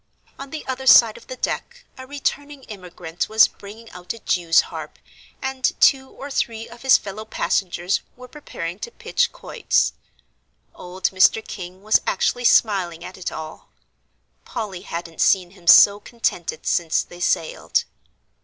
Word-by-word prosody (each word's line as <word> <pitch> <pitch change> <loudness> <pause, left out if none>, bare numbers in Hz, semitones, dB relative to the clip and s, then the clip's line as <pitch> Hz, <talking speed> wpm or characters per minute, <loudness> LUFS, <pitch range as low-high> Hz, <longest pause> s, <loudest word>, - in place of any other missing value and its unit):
On 275 0 -8
the 310 +1 -7
other 265 0 -5
side 230 -4 +7
of - - -15
the 255 - -7
deck 485 - -4
a 260 0 -11
returning 285 0 -4
immigrant 180 -5 -6
was 220 0 +6
bringing 215 +3 -13
out 180 +3 -7
a - - -11
jew's 175 -6 +2
harp, - - -8 0.5
and 265 -1 -1
two 265 -1 +4
or 280 +1 -10
three 225 -3 -2
of 235 +1 -14
his 265 -1 +6
fellow 205 +2 -8
passengers 190 -4 -1
were 250 0 -12
preparing 185 - -7
to - - -6
pitch 485 +1 -1
quoits. 475 - 0 0.8
Old 180 +1 -3
Mr. 190 +3 +3
King 185 -1 -9
was 215 +1 +3
actually 245 +5 0
smiling 185 -8 +2
at 185 - -9
it 185 - -5
all. 160 0 -9 0.7
Polly 210 -7 -6
hadn't 170 -1 -6
seen 180 -3 +3
him 180 -3 -20
so 200 +3 +8
contented 205 -8 -3
since 165 -2 +1
they 175 - -14
sailed. 165 -2 0
210 Hz, 155 wpm, -22 LUFS, 180-255 Hz, 0.8 s, so